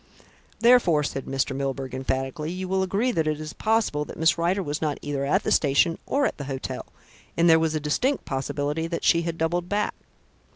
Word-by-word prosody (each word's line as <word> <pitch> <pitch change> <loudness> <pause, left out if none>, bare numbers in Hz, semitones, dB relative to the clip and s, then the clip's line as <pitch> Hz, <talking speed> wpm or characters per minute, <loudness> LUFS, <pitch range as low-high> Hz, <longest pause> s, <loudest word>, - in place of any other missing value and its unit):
Therefore," 230 -11 +5
said 135 -1 -4
Mr. 135 0 -1
Milburgh 135 -1 -3
emphatically, 135 +4 -2
"you 185 +2 -4
will 190 +1 +1
agree 200 +7 +1
that 160 -8 0
it 155 -1 -1
is 155 -1 -6
possible 220 -9 +1
that - - -10
Miss 160 +1 +4
Rider 175 +3 0
was 145 -1 -3
not 150 -2 -1
either 145 -1 -2
at 140 - +2
the - - -1
station 150 +3 +3
or 280 +1 +1
at - - -1
the 140 - -4
hotel, 135 -1 -5 0.5
and 170 +1 +4
there 160 -1 +7
was 160 -1 0
a - - +1
distinct 245 - 0
possibility 145 +4 -2
that 170 0 -4
she 170 - +4
had 165 -1 -3
doubled 175 +2 -1
back." 205 +1 0
160 Hz, 205 wpm, -25 LUFS, 145-180 Hz, 0.5 s, there